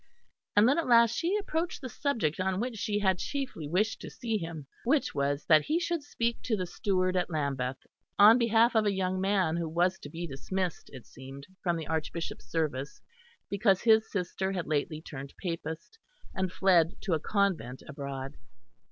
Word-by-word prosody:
And 205 Hz, +2 st, +6 dB
then 280 Hz, +6 st, +3 dB
at 330 Hz, -, -2 dB
last 235 Hz, -1 st, +5 dB
she 355 Hz, +5 st, +1 dB
approached 345 Hz, -4 st, -2 dB
the 265 Hz, -, -6 dB
subject 240 Hz, -, -1 dB
on 190 Hz, 0 st, 0 dB
which 245 Hz, +1 st, -2 dB
she 205 Hz, 0 st, -1 dB
had 190 Hz, -3 st, +2 dB
chiefly 270 Hz, -, -4 dB
wished 200 Hz, +8 st, 0 dB
to -, -, -7 dB
see 230 Hz, -2 st, -3 dB
him 165 Hz, -4 st, -6 dB, 0.2 s
which 275 Hz, +4 st, +1 dB
was 140 Hz, 0 st, -1 dB
that 155 Hz, -2 st, +5 dB
he 320 Hz, +2 st, +1 dB
should 340 Hz, -1 st, -1 dB
speak 235 Hz, -5 st, -2 dB
to 220 Hz, -3 st, -1 dB
the 185 Hz, -, -2 dB
steward 185 Hz, +1 st, 0 dB
at 180 Hz, -1 st, 0 dB
Lambeth 135 Hz, -5 st, -2 dB, 0.4 s
on 215 Hz, +4 st, +8 dB
behalf 230 Hz, 0 st, +4 dB
of 215 Hz, -1 st, +3 dB
a -, -, +3 dB
young 185 Hz, -1 st, -1 dB
man 190 Hz, -4 st, +1 dB
who 170 Hz, -2 st, -2 dB
was 180 Hz, +3 st, +1 dB
to 145 Hz, -, -9 dB
be 165 Hz, +3 st, -5 dB
dismissed, 175 Hz, +5 st, -4 dB
it 130 Hz, -4 st, -11 dB
seemed, 135 Hz, +1 st, -11 dB, 0.2 s
from 175 Hz, -2 st, 0 dB
the 160 Hz, -, -5 dB
Archbishop's 160 Hz, -4 st, -4 dB
service, 150 Hz, -1 st, -2 dB, 0.5 s
because 200 Hz, -2 st, +2 dB
his 220 Hz, -1 st, +5 dB
sister 190 Hz, 0 st, -2 dB
had 180 Hz, -4 st, -2 dB
lately 155 Hz, +1 st, -2 dB
turned 140 Hz, -3 st, -8 dB
Papist 165 Hz, -, -5 dB, 0.3 s
and 190 Hz, -1 st, -1 dB
fled 180 Hz, -3 st, +3 dB
to 190 Hz, -, -1 dB
a 160 Hz, -, +2 dB
convent 170 Hz, -, -1 dB
abroad. 140 Hz, -1 st, -6 dB
185 Hz, 185 wpm, -29 LUFS, 155-220 Hz, 0.5 s, on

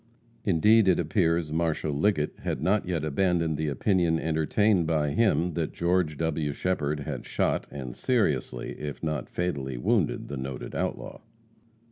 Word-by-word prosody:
Indeed 105 Hz, +4 st, +5 dB
it 90 Hz, -, +4 dB
appears 85 Hz, -1 st, +1 dB
Marshal 80 Hz, -1 st, 0 dB
Liggett 75 Hz, 0 st, 0 dB
had -, -, -3 dB
not 100 Hz, 0 st, +1 dB
yet 85 Hz, -4 st, -1 dB
abandoned 85 Hz, 0 st, +1 dB
the 80 Hz, +1 st, -2 dB
opinion 85 Hz, -, +1 dB
entertained 80 Hz, +4 st, +2 dB
by 75 Hz, -3 st, +1 dB
him, 90 Hz, -2 st, +2 dB
that 80 Hz, -1 st, -2 dB
George 85 Hz, -3 st, +1 dB
W. 80 Hz, -3 st, -1 dB
Shepherd 75 Hz, -4 st, -1 dB
had -, -, -5 dB
shot -, -, -1 dB
and 65 Hz, -4 st, -7 dB
seriously 75 Hz, -, 0 dB
if 75 Hz, +1 st, -6 dB
not 75 Hz, -5 st, -2 dB
fatally 70 Hz, -8 st, -3 dB
wounded -, -, 0 dB
the 70 Hz, -, -5 dB
noted 65 Hz, -1 st, -6 dB
outlaw. -, -, -3 dB
80 Hz, 145 wpm, -27 LUFS, 75-90 Hz, -, Indeed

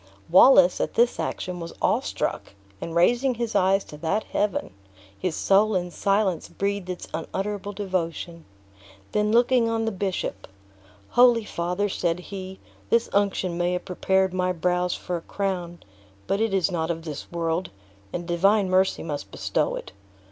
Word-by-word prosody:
Wallace, 185 Hz, -2 st, +7 dB
at -, -, -2 dB
this 235 Hz, +1 st, +3 dB
action, 180 Hz, -1 st, -3 dB
was 170 Hz, 0 st, -7 dB
awe -, -, +2 dB
struck, -, -, -3 dB, 0.3 s
and 165 Hz, -, -5 dB
raising 240 Hz, +9 st, +3 dB
his 235 Hz, -1 st, -3 dB
eyes 190 Hz, +1 st, +3 dB
to 150 Hz, -, -11 dB
that 170 Hz, +7 st, -1 dB
Heaven, 205 Hz, -, -2 dB, 0.4 s
his 180 Hz, -, -2 dB
soul 205 Hz, +2 st, +3 dB
in 180 Hz, -1 st, -1 dB
silence 195 Hz, -2 st, 0 dB
breathed 200 Hz, -2 st, -2 dB
its 180 Hz, -, -5 dB
unutterable 200 Hz, +5 st, -3 dB
devotion. 175 Hz, -4 st, -3 dB, 0.7 s
Then 210 Hz, 0 st, +1 dB
looking 240 Hz, 0 st, +4 dB
on 225 Hz, 0 st, 0 dB
the 225 Hz, -, 0 dB
bishop: 185 Hz, -, -3 dB, 0.6 s
"Holy 240 Hz, -2 st, +5 dB
father," 180 Hz, +4 st, -1 dB
said 175 Hz, -3 st, -1 dB
he, 190 Hz, 0 st, -8 dB, 0.3 s
"this 230 Hz, 0 st, +2 dB
unction 190 Hz, -3 st, 0 dB
may 175 Hz, +1 st, +1 dB
have 180 Hz, -, -3 dB
prepared 190 Hz, 0 st, +1 dB
my 185 Hz, 0 st, +1 dB
brows 180 Hz, +1 st, 0 dB
for 180 Hz, -, -4 dB
a -, -, -8 dB
crown, 180 Hz, -3 st, -4 dB, 0.4 s
but 200 Hz, -, 0 dB
it 225 Hz, -1 st, +1 dB
is 195 Hz, -1 st, +1 dB
not 160 Hz, -2 st, -1 dB
of 165 Hz, -1 st, -3 dB
this 150 Hz, -3 st, -7 dB
world, 170 Hz, +1 st, -1 dB, 0.4 s
and 175 Hz, -1 st, -5 dB
Divine 195 Hz, +3 st, +3 dB
Mercy 190 Hz, +1 st, +2 dB
must 145 Hz, -3 st, -5 dB
bestow -, -, -1 dB
it. -, -, -8 dB
185 Hz, 160 wpm, -25 LUFS, 175-205 Hz, 0.7 s, Wallace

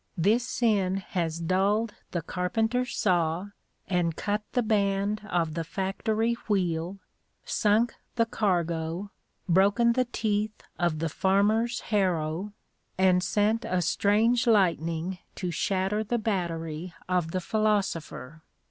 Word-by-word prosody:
This 210 Hz, +8 st, +3 dB
sin 210 Hz, -7 st, +1 dB
has 175 Hz, -5 st, -2 dB
dulled 200 Hz, +6 st, +1 dB, 0.2 s
the 170 Hz, -3 st, -3 dB
carpenter's 225 Hz, -, -1 dB
saw, 175 Hz, 0 st, +1 dB, 0.4 s
and 175 Hz, -3 st, 0 dB
cut 210 Hz, 0 st, -1 dB
the 245 Hz, -, +2 dB
band 205 Hz, -1 st, +1 dB
of 165 Hz, -4 st, 0 dB
the 165 Hz, 0 st, -2 dB
factory 215 Hz, +6 st, -1 dB
wheel, 180 Hz, -2 st, 0 dB, 0.5 s
sunk 220 Hz, +2 st, +2 dB, 0.2 s
the 230 Hz, -1 st, +3 dB
cargo, 175 Hz, -3 st, -1 dB, 0.4 s
broken 200 Hz, +6 st, +4 dB
the 255 Hz, +1 st, +2 dB
teeth 215 Hz, -2 st, -2 dB, 0.2 s
of 175 Hz, -3 st, +1 dB
the 165 Hz, +1 st, -1 dB
farmer's 210 Hz, +8 st, +2 dB
harrow, 185 Hz, -2 st, 0 dB, 0.5 s
and 185 Hz, -1 st, +4 dB
sent 210 Hz, +5 st, +1 dB
a 180 Hz, -1 st, 0 dB
strange 225 Hz, +7 st, +2 dB
lightning 175 Hz, -4 st, +2 dB, 0.2 s
to 180 Hz, -2 st, -3 dB
shatter 195 Hz, +2 st, 0 dB
the 240 Hz, +3 st, -1 dB
battery 170 Hz, -6 st, -3 dB
of 180 Hz, -3 st, 0 dB
the 185 Hz, -, -1 dB
philosopher. 190 Hz, -8 st, -1 dB
195 Hz, 120 wpm, -27 LUFS, 170-215 Hz, 0.5 s, broken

